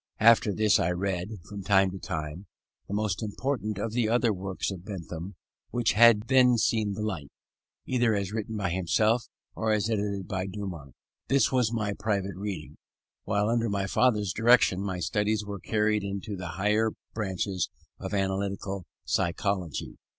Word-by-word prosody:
After 115 -1 +6
this 105 +1 +3
I 85 - +1
read, 90 +1 -1 0.2
from 100 -1 -7
time 95 -1 +3
to 95 - -7
time, 80 +5 -5 0.4
the - - -5
most 105 -2 -1
important 110 -1 -2
of 110 +2 -2
the 115 -2 +1
other 120 -1 +3
works 95 +1 -3
of 90 -3 -7
Bentham 90 -2 -6 0.3
which 120 -2 +1
had 115 -1 +6
then 125 -2 +5
seen 110 -2 +1
the 105 +2 -4
light, 85 -10 -3 0.6
either 120 -3 +2
as 100 -1 -2
written 110 0 -3
by 95 -4 -1
himself 105 +6 +2 0.3
or 110 -1 -1
as 110 +1 +1
edited 100 -3 -1
by 95 -1 -2
Dumont. 90 - -7 0.3
This 140 0 +3
was 125 -4 +2
my 105 -3 -1
private 100 -2 -2
reading: 95 -5 -5 0.5
while, 105 +1 +1
under 115 0 +1
my 100 -1 0
father's 105 -3 +2
direction, 115 -5 +4
my 95 -2 -2
studies 105 +4 0
were 100 -1 -5
carried 105 +1 +1
into 100 +1 -4
the 90 -1 -6
higher 105 +2 +2 0.2
branches 95 -3 -2 0.3
of - - -5
analytic 95 0 0 0.5
psychology. 90 -1 -1
100 Hz, 160 wpm, -28 LUFS, 95-110 Hz, 0.6 s, After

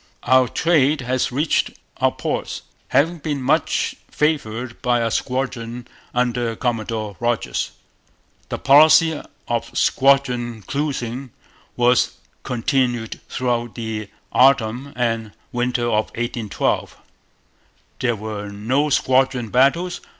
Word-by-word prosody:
'Our 130 0 +4
Trade 150 -1 +2
has 125 +1 0
reached 145 +5 +1 0.3
our - - +2
ports, - - -4 0.2
having 160 +6 +2
been 145 -1 -2
much 130 - +1 0.2
favoured 125 -6 -1
by 125 -2 +2
a 115 -1 0
squadron 125 -2 -3 0.2
under 120 -2 0
Commodore 110 -3 -2
Rodgers.' 120 -1 -1 0.8
The - - -2
policy 155 +2 +6 0.3
of 120 -1 -2
squadron 125 -5 +2
cruising 135 -1 -3 0.5
was 120 0 +3 0.3
continued 120 -2 -1
throughout 120 -2 -1
the 110 -3 -4 0.2
autumn 130 0 +3
and 115 -3 -1 0.2
winter 120 0 0
of 110 -2 +1
1812. 120 -3 -2 1.0
There 120 -2 +1
were 105 -1 -5
no 130 +9 0
squadron 130 -3 +2
battles. 140 +9 +2
125 Hz, 105 wpm, -21 LUFS, 115-135 Hz, 1.0 s, policy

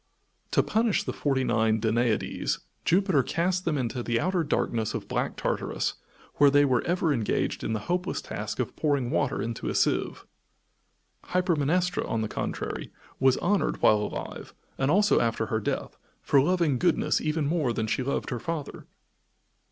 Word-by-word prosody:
To - - +3
punish 220 -2 +1
the - - -4
forty 135 -2 0
nine 110 -2 +2
Danaides, 115 +1 0 0.3
Jupiter 185 -5 +3
cast 180 +6 -1
them 155 -3 +1
into 125 -1 -2
the 120 -1 0
outer 180 +2 +1
darkness 115 -7 -1
of - - -5
Black - - -2
Tartarus, - - -1 0.4
where 145 - +7
they 145 +1 +5
were 130 -3 +2
ever 170 -3 +1
engaged 115 -5 -1
in 110 - -1
the 110 - -2
hopeless 180 - -1
task 105 0 -5
of 125 - -3
pouring 140 -5 0
water - - 0
into 115 0 -4
a - - -3
sieve. - - 0 1.0
Hypermnestra, 180 0 +1
on 115 - 0
the 110 - -1
contrary, - - -4 0.3
was 130 -1 +4
honored 200 +2 0
while 110 - +6
alive, 105 - -6 0.2
and 135 +1 0
also 205 +6 +4
after 115 -1 0
her 110 0 -1
death, 105 - -3 0.3
for 140 - +4
loving 165 -4 +1
goodness 175 -2 +2
even 155 0 0
more 150 -4 +1
than 110 -1 -1
she 110 - -1
loved 140 +2 -2
her 120 - -2
father. 160 +3 -5
140 Hz, 165 wpm, -27 LUFS, 115-175 Hz, 1.0 s, where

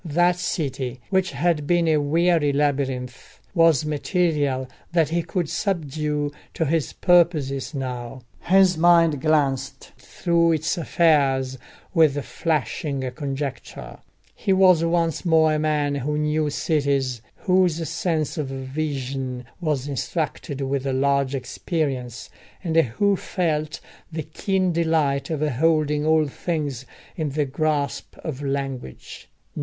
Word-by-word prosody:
That 175 +2 +2
city, 135 -8 -3
which 190 -1 +2
had 150 +1 0
been 175 0 +2
a 155 -1 +4
weary 160 +1 +2
labyrinth, 135 -3 -2
was 165 -5 +4
material 150 -4 0 0.3
that 165 -3 +3
he 170 +1 0
could 175 0 -2
subdue 150 -5 -2 0.2
to 165 - 0
his 155 0 0
purposes 160 -6 +2
now: 125 -2 -5 0.2
his 185 -2 +4
mind 165 -4 +4
glanced 145 -4 0
through 170 -1 +1
its 160 +3 0
affairs 140 -6 +2 0.3
with 150 -5 +3
flashing 140 -3 -2
conjecture; 135 -1 -6 0.3
he 195 - -2
was 185 -3 +5
once 165 -1 0
more 160 -3 +4
a 155 - 0
man 150 -2 +1
who 140 +2 -2
knew 150 0 0
cities, 140 -5 0
whose 180 -4 +1
sense 165 -1 -1
of 150 - -2
vision 135 -2 -4
was 150 -6 -1
instructed 145 0 -3
with 135 0 -1
large 140 0 +1
experience, 130 -3 -3 0.3
and 165 -2 -2
who 165 - +3
felt 155 -5 -2 0.3
the 160 -1 -4
keen 185 +4 -1
delight 160 -5 +1
of 155 -3 -2
holding 150 +1 +1
all 160 -1 +4
things 145 -4 -3 0.3
in 155 -3 -2
the 145 +1 0
grasp 145 0 -2
of 145 -3 -5
language. 135 - -5
150 Hz, 120 wpm, -23 LUFS, 135-165 Hz, 0.3 s, was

